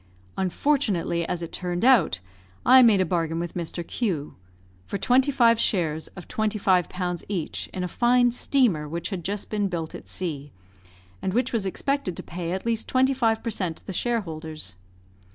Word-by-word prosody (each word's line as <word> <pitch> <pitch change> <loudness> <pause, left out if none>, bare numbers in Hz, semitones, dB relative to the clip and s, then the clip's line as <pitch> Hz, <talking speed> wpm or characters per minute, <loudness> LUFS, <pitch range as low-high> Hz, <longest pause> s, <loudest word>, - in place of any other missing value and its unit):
Unfortunately, 190 - 0
as 170 -1 -3
it 165 - -6
turned 180 +4 -2
out, 255 - +4 0.4
I 260 +1 +8
made 220 -6 +6
a - - +2
bargain 165 -1 -1
with 170 0 -4
Mr. 170 0 -4
Q 175 - -2 0.5
for 200 - -4
twenty 255 +6 +3
five 230 -4 +4
shares, 160 -8 0
of 185 - -9
25 200 -5 +1
pounds 180 -2 -3
each, 180 -6 -3
in 185 - -3
a - - -1
fine 245 +5 +3
steamer, 230 - +1
which 170 +2 -4
had 185 -3 -4
just 200 +3 -4
been 205 -2 +1
built 165 -4 -4
at - - -9
C, 145 -6 -4 0.7
and 190 +1 -2
which 250 +1 +1
was 215 -4 0
expected 275 -2 -1
to - - -5
pay 170 0 -5
at 190 +3 -3
least 230 -1 -1
twenty 260 +1 +3
five 225 -4 +1
per 230 - -2
cent. 180 -6 -1
to - - -21
the 190 - -5
shareholders. 160 - -3
185 Hz, 180 wpm, -25 LUFS, 170-230 Hz, 0.7 s, I